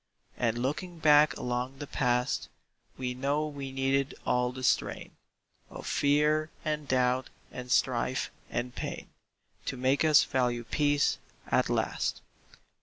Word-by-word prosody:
And 115 Hz, -1 st, 0 dB
looking 150 Hz, +8 st, -3 dB
back 150 Hz, -3 st, +5 dB
along 125 Hz, +2 st, -3 dB
the 145 Hz, -, -6 dB
past, 125 Hz, -2 st, 0 dB, 0.5 s
We 125 Hz, -1 st, -2 dB
know 140 Hz, +4 st, 0 dB
we 140 Hz, -3 st, -6 dB
needed 135 Hz, +1 st, 0 dB
all 125 Hz, 0 st, +1 dB
the 130 Hz, 0 st, -8 dB
strain -, -, 0 dB, 0.6 s
Of -, -, -9 dB
fear 150 Hz, +2 st, +2 dB, 0.2 s
and 150 Hz, -1 st, -2 dB
doubt 130 Hz, 0 st, +1 dB, 0.2 s
and 125 Hz, 0 st, -7 dB
strife 130 Hz, +1 st, +1 dB, 0.2 s
and 120 Hz, +1 st, -3 dB
pain -, -, -6 dB, 0.5 s
To 135 Hz, -, -3 dB
make 130 Hz, +4 st, +2 dB
us 155 Hz, -2 st, +6 dB
value 125 Hz, -2 st, 0 dB
peace, 145 Hz, +3 st, +1 dB, 0.3 s
at -, -, +3 dB
last. -, -, -1 dB
135 Hz, 130 wpm, -29 LUFS, 125-145 Hz, 0.6 s, us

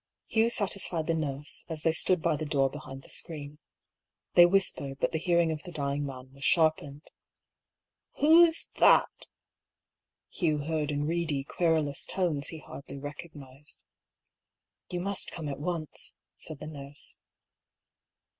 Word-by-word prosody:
Hugh 225 Hz, 0 st, +2 dB
satisfied 195 Hz, -7 st, +1 dB
the 165 Hz, -, +1 dB
nurse, 145 Hz, -2 st, -3 dB
as 160 Hz, -2 st, -2 dB
they 165 Hz, -, +4 dB
stood 165 Hz, +1 st, +2 dB
by 165 Hz, -2 st, +2 dB
the 150 Hz, -, -4 dB
door 140 Hz, -3 st, +1 dB
behind 135 Hz, -2 st, -9 dB
the -, -, -12 dB
screen. 150 Hz, -3 st, -5 dB, 0.7 s
They 175 Hz, 0 st, +8 dB
whispered, 175 Hz, -7 st, 0 dB
but -, -, +1 dB
the 160 Hz, -, -1 dB
hearing 170 Hz, -1 st, +2 dB
of 155 Hz, -1 st, -4 dB
the 180 Hz, -, -10 dB
dying 140 Hz, -2 st, -2 dB
man 130 Hz, -1 st, -9 dB
was 140 Hz, 0 st, -11 dB
sharpened. 155 Hz, -3 st, +2 dB, 1.1 s
"Who's 325 Hz, +2 st, +6 dB
— -, -, -36 dB
that?" -, -, +4 dB, 1.0 s
Hugh 155 Hz, -4 st, +1 dB
heard, 150 Hz, 0 st, -2 dB
in 145 Hz, 0 st, -1 dB
reedy, 160 Hz, -4 st, -1 dB
querulous 155 Hz, -2 st, 0 dB
tones 165 Hz, -7 st, -1 dB
he 160 Hz, -, -6 dB
hardly 140 Hz, -2 st, -10 dB
recognised. 145 Hz, -1 st, -10 dB, 0.5 s
" -, -, -61 dB
You 175 Hz, -1 st, -2 dB
must 200 Hz, +1 st, +1 dB
come 160 Hz, -3 st, -6 dB
at 140 Hz, -1 st, -4 dB
once," 165 Hz, -1 st, -3 dB, 0.2 s
said 155 Hz, -, -5 dB
the -, -, -7 dB
nurse. 145 Hz, -1 st, -8 dB
155 Hz, 145 wpm, -29 LUFS, 145-170 Hz, 1.1 s, They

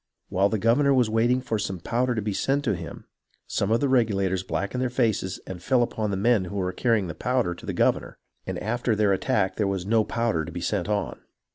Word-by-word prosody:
While 95 Hz, +2 st, +2 dB
the 110 Hz, -, 0 dB
governor 135 Hz, +6 st, +3 dB
was 120 Hz, -4 st, +2 dB
waiting 120 Hz, +3 st, +2 dB
for 115 Hz, -4 st, -2 dB
some 95 Hz, -3 st, -3 dB
powder 120 Hz, +7 st, 0 dB
to 110 Hz, -, -2 dB
be 105 Hz, -1 st, -2 dB
sent 140 Hz, +7 st, 0 dB
him, 85 Hz, -8 st, -3 dB, 0.4 s
some 100 Hz, -, -1 dB
of 115 Hz, +1 st, +2 dB
the 140 Hz, -, +2 dB
Reg 125 Hz, -4 st, +4 dB
ulators 95 Hz, -3 st, 0 dB
blackened 100 Hz, +6 st, -2 dB
their 130 Hz, -, 0 dB
faces 110 Hz, -7 st, 0 dB
and 90 Hz, -2 st, -7 dB
fell 125 Hz, +6 st, +3 dB
upon 110 Hz, -2 st, -2 dB
the 100 Hz, -, -1 dB
men 105 Hz, -1 st, +2 dB
who 90 Hz, -, -7 dB
were 90 Hz, -2 st, -1 dB
carrying 115 Hz, -2 st, +1 dB
the 85 Hz, -, -5 dB
powder 125 Hz, -5 st, 0 dB
to 85 Hz, -, -12 dB
the -, -, -1 dB
governor, -, -, 0 dB, 0.3 s
and -, -, -3 dB
after 120 Hz, +1 st, 0 dB
their 105 Hz, -2 st, +3 dB
attack 95 Hz, 0 st, 0 dB
there 105 Hz, -, +1 dB
tvas 95 Hz, -2 st, -2 dB
no 110 Hz, +1 st, +3 dB
poivder 115 Hz, -8 st, -1 dB
to -, -, -7 dB
be -, -, -5 dB
sent 100 Hz, +2 st, -2 dB
on. 105 Hz, -1 st, -2 dB
110 Hz, 235 wpm, -25 LUFS, 95-120 Hz, 0.4 s, Reg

